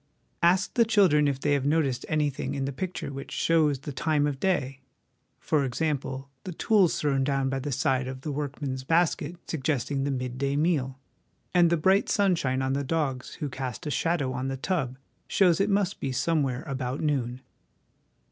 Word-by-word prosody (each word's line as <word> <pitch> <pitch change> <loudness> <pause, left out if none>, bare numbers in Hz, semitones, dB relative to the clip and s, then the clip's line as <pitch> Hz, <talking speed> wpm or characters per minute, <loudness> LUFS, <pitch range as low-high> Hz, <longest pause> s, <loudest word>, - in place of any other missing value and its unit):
Ask 180 +3 +3
the 235 - +5
children 190 -10 +4
if 140 -2 -1
they 145 +1 +1
have 140 -2 +1
noticed 140 -3 0
anything 145 -3 -1
in 135 -1 -1
the 140 - -2
picture 180 -2 -4
which 135 0 -7
shows 155 -4 +2
the 140 +3 -7
time 150 +1 +1
of 145 -2 -2
day: 135 -8 0 0.6
for 150 -3 +1
example, 135 0 -2 0.2
the 185 - -6
tools 195 -1 +3
thrown 135 -2 +1
down 135 -1 0
by 135 0 -1
the 145 +2 -4
side 130 0 +1
of 130 0 -6
the 150 - -4
workman's 140 -2 -4
basket 165 +1 +1
suggesting 140 -2 -1
the 140 - -1
mid 130 -2 -3
day 140 0 0
meal; 145 -4 0 0.6
and 175 -2 +5
the 170 - +2
bright 190 +5 +3
sunshine 165 -10 +1
on 130 0 0
the 140 +1 -1
dogs 135 -4 -2
who 150 - -4
cast 130 -1 -5
a 150 - -2
shadow 145 -5 0
on 130 +1 -3
the 135 0 -3
tub 130 -5 -2 0.3
shows 180 -3 +3
it 200 - +2
must 200 -2 +1
be 135 - -2
somewhere 135 -2 0
about 130 -1 -3
noon. 130 -5 -1
140 Hz, 185 wpm, -27 LUFS, 130-165 Hz, 0.6 s, the